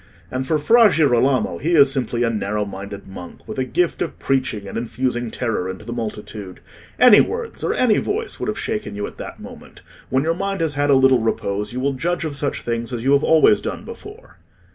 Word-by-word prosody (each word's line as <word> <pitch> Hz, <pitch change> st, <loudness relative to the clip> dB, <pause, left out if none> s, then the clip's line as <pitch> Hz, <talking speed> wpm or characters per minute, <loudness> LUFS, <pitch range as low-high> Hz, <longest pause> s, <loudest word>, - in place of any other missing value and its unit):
And 130 Hz, +1 st, -3 dB
for 155 Hz, -, +2 dB
Fra 225 Hz, +9 st, +5 dB
Girolamo, 135 Hz, -4 st, +2 dB
he 170 Hz, +4 st, 0 dB
is 140 Hz, -3 st, +6 dB
simply 125 Hz, -3 st, -1 dB
a 115 Hz, -, +1 dB
narrow 105 Hz, -1 st, -2 dB
minded 100 Hz, 0 st, -8 dB
monk, 90 Hz, -2 st, -11 dB
with -, -, -5 dB
a -, -, +2 dB
gift 175 Hz, +6 st, 0 dB
of 170 Hz, -, -3 dB
preaching 130 Hz, -7 st, -1 dB
and -, -, -8 dB
infusing 120 Hz, 0 st, -2 dB
terror 110 Hz, -6 st, -2 dB
into 95 Hz, +3 st, -8 dB
the 120 Hz, -, -5 dB
multitude. 105 Hz, -4 st, -6 dB, 0.4 s
Any 245 Hz, -4 st, +8 dB
words 465 Hz, 0 st, -4 dB
or -, -, 0 dB
any 230 Hz, -5 st, +3 dB
voice 445 Hz, +2 st, -3 dB
would -, -, -3 dB
have -, -, -2 dB
shaken 215 Hz, -, -4 dB
you 105 Hz, 0 st, -3 dB
at -, -, -10 dB
that -, -, -8 dB
moment. -, -, -12 dB, 0.3 s
When 130 Hz, +1 st, +1 dB
your 165 Hz, +1 st, +1 dB
mind 195 Hz, +2 st, -3 dB
has 160 Hz, -3 st, 0 dB
had 145 Hz, +1 st, 0 dB
a 140 Hz, -, +6 dB
little 130 Hz, -1 st, +5 dB
repose, 105 Hz, -2 st, -2 dB
you 125 Hz, -, -4 dB
will 140 Hz, +2 st, 0 dB
judge 170 Hz, +5 st, -2 dB
of 150 Hz, -2 st, -4 dB
such 140 Hz, 0 st, -2 dB
things 115 Hz, 0 st, -3 dB
as 120 Hz, -2 st, -4 dB
you 135 Hz, -, +2 dB
have 140 Hz, -, +3 dB
always 160 Hz, -1 st, +5 dB
done -, -, -5 dB
before." 460 Hz, +1 st, -12 dB
130 Hz, 220 wpm, -21 LUFS, 110-160 Hz, 0.4 s, Any